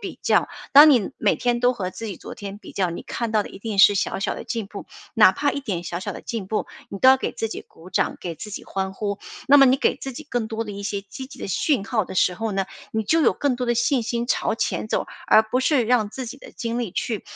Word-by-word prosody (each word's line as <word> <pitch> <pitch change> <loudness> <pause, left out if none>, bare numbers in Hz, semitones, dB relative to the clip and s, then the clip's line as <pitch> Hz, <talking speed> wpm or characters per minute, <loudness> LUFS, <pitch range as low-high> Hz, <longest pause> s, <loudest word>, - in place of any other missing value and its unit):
比 - - -7
较， - - +2 0.2
当 295 +2 +10
你 245 -7 +3
每 - - +2
天 240 -1 0
都 250 0 +3
和 185 -4 -3
自 225 - -7
己 200 -4 -5
昨 - - -9
天 200 -1 -7
比 205 - -13
较， 185 -2 0
你 170 - -6
看 235 -2 -4
到 215 -1 +2
的 - - -10
一 - - -11
定 210 -1 -5
是 205 +1 +8
小 195 - -1
小 - - -1
的 - - -7
进 225 -4 -4
步。 200 0 -9 0.3
哪 215 -5 +6
怕 285 +8 0
一 280 - -3
点 185 -9 -4
小 175 +1 -4
小 - - -4
的 - - -9
进 220 -5 -4
步， 215 - -2 0.2
你 195 - -7
都 260 - +7
要 265 - +5
给 - - -2
自 225 - -3
己 - - -5
鼓 170 +3 -15
掌， - - 0
给 170 -2 -5
自 210 - -9
己 205 - -7
欢 190 0 -3
呼。 200 0 -3 0.3
那 285 +1 +7
么 275 - +8
你 260 +1 +4
给 - - +1
自 270 -2 -6
己 310 - -7
更 245 -6 -2
多 225 0 -3
的 210 - -7
一 200 - -7
些 200 0 -3
积 235 +6 -9
极 270 - -13
的 - - -5
讯 200 - 0
号 220 -4 -1
的 - - -8
时 180 - +3
候 220 +2 -3
呢， 195 0 0 0.3
你 220 - 0
就 325 +10 +3
有 - - +4
更 285 -3 0
多 250 0 -3
的 240 - +2
信 240 +2 +2
心 235 +1 -2
朝 245 - 0
前 220 - -2
走， - - -1 0.2
而 215 - +6
不 235 +4 -1
是 260 -3 +2
让 225 -3 +2
自 260 +4 -6
己 255 +4 -8
的 - - -13
精 235 0 -3
力 235 -5 -2
去 220 +2 -3
225 Hz, 310 characters per minute, -23 LUFS, 200-250 Hz, 0.3 s, 当